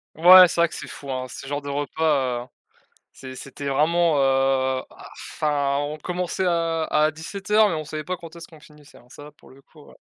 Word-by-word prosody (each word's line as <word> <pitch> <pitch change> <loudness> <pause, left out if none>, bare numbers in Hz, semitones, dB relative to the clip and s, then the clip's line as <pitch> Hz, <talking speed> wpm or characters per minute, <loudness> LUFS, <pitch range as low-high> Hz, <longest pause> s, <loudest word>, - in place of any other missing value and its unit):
Ouais 180 +3 +9
c'est 170 - -2
vrai 170 - +4
que - - -11
c'est - - -8
fou, 140 - -10
hein, 130 -1 -3
ce 130 - -10
genre 145 +1 -4
de 140 - -7
repas, 140 -3 -1
heu, - - -19 0.7
c'est 130 -1 -10
c'était 140 +2 -8
vraiment 160 +3 +2
heu 135 -1 +1
bah, - - -14 0.2
enfin, 140 -2 -1
on 145 +1 -4
commençait 180 +3 -3
à 165 -2 0
à 155 0 +1
17:00 200 +7 0
mais - - -2
on 155 -1 -4
savait 155 +1 -6
pas 180 +2 -4
quand 165 0 -12
est-ce 170 - -10
qu'on 160 -2 -18
finissait, 150 -1 -18
hein, 120 - -22
ça 145 +3 -13
pour - - -19
le 135 +1 -18
coup 150 +1 -19
ouais. - - -18
150 Hz, 220 wpm, -23 LUFS, 140-170 Hz, 0.7 s, Ouais